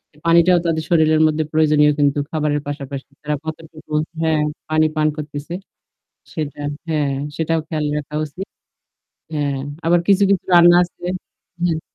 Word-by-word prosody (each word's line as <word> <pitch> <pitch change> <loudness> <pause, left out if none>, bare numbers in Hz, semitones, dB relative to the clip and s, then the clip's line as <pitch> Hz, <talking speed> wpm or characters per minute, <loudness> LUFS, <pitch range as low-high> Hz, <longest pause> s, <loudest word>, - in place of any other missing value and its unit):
এ - - -22
পানিটাও 170 +1 +5
তাদের 160 -1 0
শরীরের 155 -2 +4
মধ্যে 155 0 0
প্রয়োজনীয় 150 -1 +4
কিন্তু 145 0 +2
খাবারের 150 -2 0
পাশাপাশি। 140 -1 -6
তারা 150 0 -1
কতটুকু 160 -1 -9 0.3
হ্যাঁ, 160 -2 +2 0.3
পানি 155 0 +3
পান 155 0 +2
করতেছে। 150 +2 -6 0.8
সেটা 150 -2 -4 0.3
হ্যাঁ, 150 -3 0 0.3
সেটাও 165 0 0
খেয়াল 155 -2 -2
রাখা 150 0 -6
উচিত। 165 +6 -7 0.9
হ্যাঁ, 145 -2 -1 0.3
আবার 175 +1 +4
কিছু, 200 0 +5
কিছু 195 -3 +2
রান্না 175 0 +8
আছে 175 0 -7 0.6
হ্যাঁ। 165 -3 +1
155 Hz, 140 wpm, -20 LUFS, 150-165 Hz, 0.9 s, রান্না